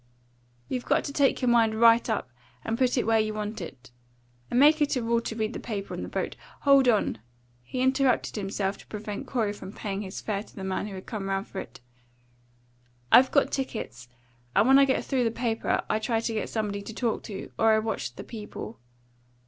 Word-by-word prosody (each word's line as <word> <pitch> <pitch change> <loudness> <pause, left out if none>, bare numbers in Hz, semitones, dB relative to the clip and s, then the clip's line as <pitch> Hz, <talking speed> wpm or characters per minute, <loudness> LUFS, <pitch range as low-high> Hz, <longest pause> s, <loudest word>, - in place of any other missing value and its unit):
You 255 - -1
got 285 +5 +1
to 280 - -5
take 280 -2 +2
your 250 - +3
mind 225 -2 +3
right 230 +1 +6
up 205 - -2 0.3
and 225 - 0
put 255 +1 +1
it 245 - +1
where 225 0 +3
you 215 0 0
want 215 0 -4
it. 130 -6 -9 0.6
I - - -3
make 300 +4 +6
it 290 -1 +2
a 250 - -1
rule 230 0 +2
to 225 - -5
read 220 +1 -2
the - - -5
paper 200 -4 -5
on - - -4
the - - -5
boat - - -3 0.3
Hold 275 -2 +5
on!" 215 - +2 0.4
he 185 - -4
interrupted 260 -1 +2
himself 195 -1 -2
to - - -15
prevent 210 -1 -6
Corey 220 -5 0
from 190 -2 -9
paying 200 -2 -4
his 190 -1 -6
fare 200 -2 -2
to 210 - -16
the 195 - -7
man 190 +2 -2
who 200 - -7
had 185 - -8
come 205 -4 -4
round 195 +1 -1
for 195 - -7
it. - - -9 1.3
"I've 255 +2 +8
got 280 - +2
tickets. 220 - -4 0.5
And 220 - +5
when 270 +1 +7
I 275 - +7
get 265 - 0
through 260 -3 +1
the 230 - +2
paper, 230 0 -1
I 215 - +1
try 225 +1 0
to 230 0 -2
get 215 - -2
somebody 210 -2 -2
to 220 +2 -8
talk 235 -2 -1
to, 200 -3 -7
or 225 0 +5
I - - +5
watch 215 - -3
the - - -7
people. 215 0 -8
225 Hz, 220 wpm, -27 LUFS, 205-250 Hz, 1.3 s, I've